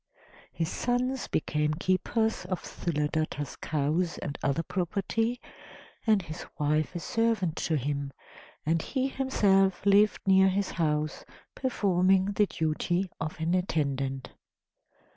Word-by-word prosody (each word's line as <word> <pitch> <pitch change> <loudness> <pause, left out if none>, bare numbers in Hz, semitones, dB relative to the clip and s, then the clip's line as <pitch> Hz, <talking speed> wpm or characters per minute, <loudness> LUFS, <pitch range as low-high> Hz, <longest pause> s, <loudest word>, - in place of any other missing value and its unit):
His 165 -1 -2
sons 250 +2 -1
became 150 0 0
keepers 185 +5 0
of 180 -1 -3
Sthuladatta's 150 -2 -2
cows 155 +4 0
and 145 - -5
other 140 +4 0
property, 210 +7 -1 0.7
and 210 -4 +4
his 155 -2 -7
wife 155 +3 0
a - - -1
servant 220 -4 0
to 160 - 0
him, 140 +1 -2 0.5
and 160 +1 +2
he 265 - -1
himself 195 -9 +2
lived 205 +1 +4
near 190 0 +6
his 195 +1 -1
house, 150 -2 -1 0.3
performing 190 -5 +2
the 205 0 +2
duty 175 +4 -1
of 160 +1 -4
an 165 +2 0
attendant. 140 -7 -1
180 Hz, 120 wpm, -29 LUFS, 155-200 Hz, 0.7 s, near